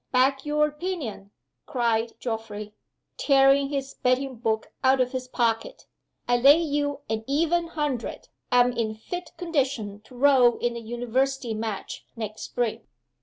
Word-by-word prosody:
"Back 270 +2 +2
your 300 0 +3
opinion!" 300 - -5 0.4
cried 235 -4 0
Geoffrey, 220 -3 -5 0.4
tearing 275 0 +4
his 275 -1 -3
betting 255 0 0
book 220 -1 -1
out 260 0 +4
of 250 -1 +2
his 255 -1 -4
pocket. 240 - -1 0.4
"I 245 0 +3
lay 275 +5 +7
you 290 -3 -1
an 220 0 -2
even 335 +4 +1
hundred 295 -7 -3 0.2
I'm 245 0 +5
in 225 -2 -2
fit 350 +10 -6
condition 265 - -1
to 255 - -15
row 255 -2 +5
in 240 0 -1
the 235 - -6
University 245 +2 -1
Match 215 -2 -4
next 215 -2 -6
spring." 240 -3 -2
255 Hz, 140 wpm, -26 LUFS, 230-285 Hz, 0.4 s, lay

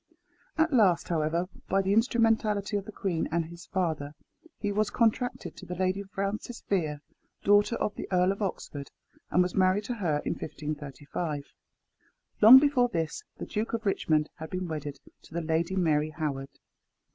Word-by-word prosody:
At 315 -1 +2
last, 200 -8 +4
however, 165 +1 0 0.2
by 195 +1 +2
the 195 +1 +1
instrumentality 225 -3 +2
of 200 -1 -1
the 215 - -8
queen 185 -5 -2
and 170 0 +1
his 170 +2 -11
father, 155 -5 -2 0.4
he 205 - -2
was 210 +1 +1
contracted 245 +2 0
to - - -11
the 180 - -4
Lady 185 +2 0
Frances 200 +4 -4
Vere, 155 -7 0 0.4
daughter 205 +3 +4
of 210 - -1
the - - -6
Earl 180 0 +3
of 200 - -5
Oxford, 145 -7 -4 0.4
and 180 - +4
was 180 - -3
married 190 +2 +3
to 245 - -3
her 175 -10 0
in - - 0
1535. 150 0 -5 1.0
Long 225 +5 +12
before 265 -3 +4
this 165 -6 -3
the - - -5
Duke 215 +2 -3
of 225 -1 -2
Richmond 155 -6 +1
had 160 0 -7
been 185 0 -3
wedded 150 -3 -5 0.2
to 160 - -14
the 170 - 0
Lady 165 +3 0
Mary 155 -4 +2
Howard. 145 -3 -3
185 Hz, 170 wpm, -28 LUFS, 155-210 Hz, 1.0 s, Long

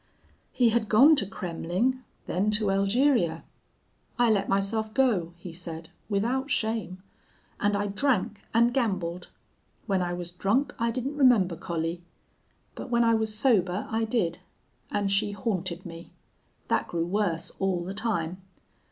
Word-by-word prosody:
He 245 -2 +3
had 225 -1 0
gone 275 +9 +7
to 200 - +2
Kremmling, 185 +7 -2 0.3
then 195 +4 0
to 210 -2 0
Elgeria. 195 - +2 0.7
"'I 240 -2 +4
let 200 -2 +1
myself 215 +3 0
go,' 195 -11 +1
he 170 -1 -9
said, 165 -1 -7 0.2
without 240 +7 0
shame, 220 -6 -2 0.6
'and 205 0 +1
I 205 - -1
drank 210 -1 0
and 235 +1 +3
gambled. 185 -8 -1 0.6
When 195 -3 +1
I 175 0 -1
was 175 0 -5
drunk 205 +10 0
I 230 0 +1
didn't 260 +5 -3
remember 230 -11 +4
Collie. 165 +1 -3 0.7
But - - -8
when 235 0 +3
I 230 0 +4
was 220 -1 0
sober 205 -6 +2
I 225 0 +1
did. 220 -7 -1 0.5
And 200 -1 -1
she 205 +1 +1
haunted 185 -4 -3
me. 165 0 -10 0.5
That - - 0
grew 170 -1 -2
worse 175 -3 -1
all 190 -3 0
the 185 +2 -5
time. 190 -5 -2
200 Hz, 145 wpm, -27 LUFS, 180-230 Hz, 0.7 s, gone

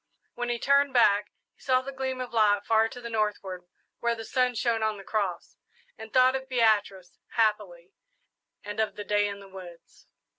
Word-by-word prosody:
When 245 0 -4
he 240 - 0
turned 280 +2 +2
back, 205 -3 +4 0.2
he - - -29
saw 255 -1 +2
the 275 - -6
gleam 260 -1 -4
of 250 -1 -6
light 205 -2 +3
far 225 0 +3
to 245 - -10
the 235 - -7
northward, 200 -5 -2 0.3
where 235 0 0
the 225 -1 -8
sun 250 -1 +1
shone 230 -1 0
on 215 -1 0
the 195 - -10
cross, 195 -5 -3 0.4
and 220 0 -11
thought 255 0 +4
of 265 0 -5
Beatrice, 210 -7 +1 0.2
happily, 210 -6 0 0.7
and 205 +1 -6
of 220 - 0
the 205 - -6
day 205 0 +1
in 200 0 -6
the 200 - -13
woods. 180 -3 -13
220 Hz, 190 wpm, -27 LUFS, 205-245 Hz, 0.7 s, back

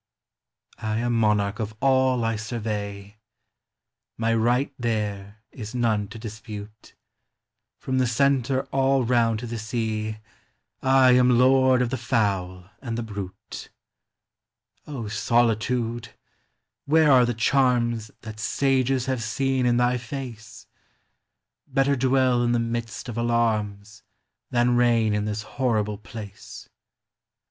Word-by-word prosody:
I 110 0 -2
am 120 +1 0
monarch 105 -2 +1
of 110 -1 -4
all 130 -3 +2
T 115 - 0
survey, 105 -2 -5 0.5
— - - -62
My 115 0 +1
right 120 +5 +1
there 105 -2 -3
is 110 -1 -8
none 110 -4 +1
to 115 - -10
dispute; 110 -1 -9 0.8
From 130 0 -2
the 130 - +2
centre; 135 +1 +1
all 135 -1 +2
round 115 -2 +2
to - - -5
the 115 -1 -5
sea, 110 -1 -2
T 110 - -14 0.6
am 125 -2 +5
lord 130 0 +4
of 120 - -3
the 130 - -2
fowl 95 -5 -1
and 115 -4 -4
the 120 - -2
brute. 100 -3 -8 1.4
Solitude! 115 +2 0 0.8
where 155 0 +4
are 130 -2 +6
the 120 -1 0
charms 120 -3 +1
That 110 -1 -9
sages 130 +1 +1
have 130 -3 -2
seen 130 +3 0
in 120 0 +3
tby 125 0 +2
face? 120 -3 -8 1.0
Better 140 0 +2
dwell 130 -1 +2
in 120 0 +1
the - - +2
midst 115 0 -4
of 120 -1 -4
alarms 110 -3 -1 0.5
Than 120 0 +2
reign 115 -3 +3
in 105 0 -1
this 105 0 -3
horrible 105 -3 -1
place. 105 -2 -10
115 Hz, 125 wpm, -24 LUFS, 110-125 Hz, 1.4 s, are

